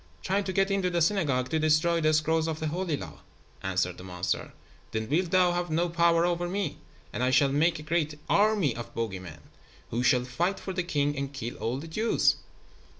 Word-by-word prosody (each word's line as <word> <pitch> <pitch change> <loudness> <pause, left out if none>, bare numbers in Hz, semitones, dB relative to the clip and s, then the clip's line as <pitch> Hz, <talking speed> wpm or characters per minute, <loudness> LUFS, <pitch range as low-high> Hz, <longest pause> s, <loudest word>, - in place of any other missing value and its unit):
"Trying 195 +1 0
to 190 - -2
get 195 +1 +1
into 195 -2 +1
the 175 -1 0
synagogue 155 -9 +1
to 160 - 0
destroy 155 +2 +3
the 155 0 +3
scrolls 160 +1 +2
of 160 -1 -3
the 155 - -2
Holy 170 -2 -1
Law," - - -9 0.4
answered 90 -1 -1
the - - -9
monster. 90 -1 -3 0.4
"Then 110 0 -2
wilt 170 +7 +1
thou 180 -1 +4
have 175 0 -2
no 170 +3 +1
power 170 0 +3
over 175 0 0
me, 190 -5 -2 0.3
and - - -3
I 125 - +3
shall 135 +1 +4
make 165 +4 +2
a 150 - -8
great 155 -2 -1
army 205 - +3
of 120 - -8
bogey 110 -5 -2
men 80 -5 -10 0.5
who 120 - 0
shall 125 0 +3
fight 175 +10 -1
for 190 - -5
the 180 - 0
king 145 -4 0
and 140 0 -3
kill 120 -4 -5
all 120 +3 -2
the 150 +4 -7
Jews." 215 +8 +2
155 Hz, 210 wpm, -28 LUFS, 130-175 Hz, 0.5 s, thou